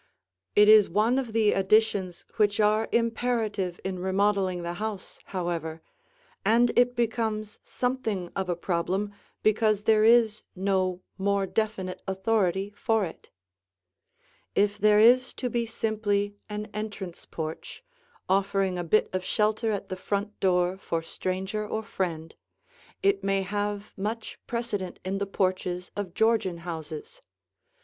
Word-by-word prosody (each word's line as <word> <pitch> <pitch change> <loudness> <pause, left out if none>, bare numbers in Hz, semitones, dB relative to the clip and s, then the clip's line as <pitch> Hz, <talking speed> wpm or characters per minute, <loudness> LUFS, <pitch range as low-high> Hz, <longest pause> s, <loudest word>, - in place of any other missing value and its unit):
It 210 0 +7
is 215 -2 +8
one 220 +8 +2
of 250 -4 -4
the 220 -1 +3
additions 195 -2 +2
which 205 -1 +2
are 215 +1 +3
imperative 225 -5 0
in 190 -1 -3
remodeling 190 -1 +1
the 170 0 -3
house, 215 -3 -5
however, 170 -3 -3 0.6
and 235 +4 +4
it 245 0 +4
becomes 220 -3 -1
something 225 -8 -2
of 190 -1 -2
a 175 - +1
problem 185 +4 -1 0.3
because 215 -1 +3
there 220 -1 +4
is 225 -1 +5
no 185 -1 0 0.2
more 200 0 +1
definite 195 -3 -2
authority 190 0 0
for 220 -2 +1
it. 165 - -10 1.3
If 205 0 +2
there 210 0 +5
is 245 +3 +5
to 250 -2 -3
be 235 0 0
simply 205 -2 -1 0.2
an 210 0 -4
entrance 205 -4 -6
porch, 160 - -6 0.4
offering 195 -1 +1
a - - -1
bit 195 +6 +3
of 185 0 -1
shelter 215 +3 +1
at 205 - -3
the 185 - -3
front 200 +2 -3
door 180 0 +2
for 165 -3 -2
stranger 190 +5 -3
or 220 +1 -3
friend, 165 -5 -3 0.7
it 395 0 +2
may 195 0 +1
have 205 +1 -3
much 215 +3 -4
precedent 220 -6 -3
in 195 +1 -1
the 200 - -2
porches 185 -2 -1
of 195 -4 -5
Georgian 220 -6 +2
houses. 160 -3 -7
205 Hz, 135 wpm, -27 LUFS, 185-220 Hz, 1.3 s, is